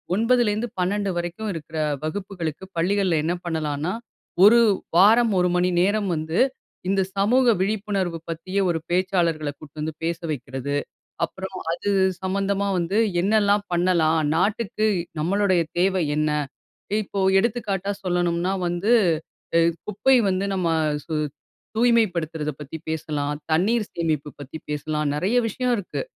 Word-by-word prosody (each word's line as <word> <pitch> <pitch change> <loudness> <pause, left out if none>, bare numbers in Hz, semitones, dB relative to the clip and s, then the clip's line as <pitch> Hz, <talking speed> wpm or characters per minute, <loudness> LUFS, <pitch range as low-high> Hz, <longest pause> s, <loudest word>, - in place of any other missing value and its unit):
9லிருந்து 230 0 +2
12 200 +2 0
வரைக்கும் 175 +5 -3
இருக்கற 160 0 -7 0.3
வகுப்புகளுக்கு, 180 -1 -4
பள்ளிகள்ல 185 0 +2
என்ன 170 +2 0
பண்ணலான்னா, 155 0 -2 0.5
1 235 +3 +8 0.4
வாரம் 220 +5 +6
1 180 0 +3
மணி 180 +1 +2
நேரம் 205 +1 +1
வந்து, 160 +2 -2 0.5
இந்த 195 0 +2 0.2
சமூக 245 +6 +3 0.2
விழிப்புணர்வு 195 -4 -1
பத்திய 185 +4 -3
ஒரு 165 -1 0
பேச்சாளர்கள 175 -4 +1
கூட்டு 155 0 -12
வந்து 155 0 -3
பேச 170 0 -1
வைக்கிறது. 135 +1 -4 0.5
அப்புறம் 190 0 -8 0.2
அது 200 +4 -2 0.3
சம்பந்தமா 200 +1 0
வந்து 180 +5 0 0.2
என்னல்லாம் 205 0 +3
பண்ணலாம். 170 -3 +3 0.2
நாட்டுக்கு 215 +3 0 0.3
நம்முடைய 185 +1 +2 0.2
தேவை 185 -1 +2
என்ன? 155 0 +1 0.7
இப்போ 200 0 -5 0.2
எடுத்துக்காட்டா 205 -3 -1
சொல்லணும்னா 175 0 0
வந்து 175 +7 +1 0.6
அ - - +6 0.3
குப்பை 235 +6 +3
வந்து 190 +1 0
நம்ம 180 -2 0 0.4
சு 160 - -5 0.6
தூய்மைப்படுத்துறத 175 -10 +1
பத்தி 150 +3 -7
பேசலாம், 150 -2 -2 0.2
தண்ணீர் 210 +7 +2
சேமிப்பு 155 -4 -1
பத்தி 145 +2 -7
பேசலாம். 150 +1 -2
நெறைய 190 +10 0
விஷயம் 250 +3 0
இருக்கு. 195 - -4
185 Hz, 120 wpm, -23 LUFS, 160-205 Hz, 0.7 s, 1